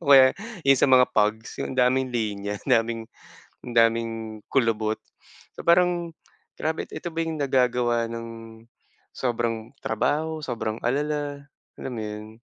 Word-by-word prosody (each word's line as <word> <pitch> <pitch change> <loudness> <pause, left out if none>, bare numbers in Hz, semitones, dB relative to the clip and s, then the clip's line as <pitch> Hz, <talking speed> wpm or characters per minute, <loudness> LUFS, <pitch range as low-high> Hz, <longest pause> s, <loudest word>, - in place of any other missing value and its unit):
o 140 -3 +7
kaya 130 -1 +9 0.3
yung 135 -1 +5
sa - - +5
mga 130 -1 +7
pugs, 110 +1 0
yung - - -3
daming 130 0 +2
linya, 105 -3 -2
daming, 115 0 +1 0.6
ang 120 - -6
daming 115 0 +3 0.3
kulubot. 110 -4 +1 0.6
So - - -8
parang, 175 -1 +3 0.4
grabe. 160 +1 -2
Ito 175 - -5
ba 165 - -7
yung 160 -1 -3
nagagawa 125 -3 +2
ng 115 0 -5 0.9
sobrang 120 0 -2
trabaho, 155 +8 0
sobrang 110 -4 -3
alala, 145 +2 -1 0.3
alam 130 - -5
mo 110 - -4
'yon. 105 +1 -8
120 Hz, 135 wpm, -25 LUFS, 115-140 Hz, 0.9 s, kaya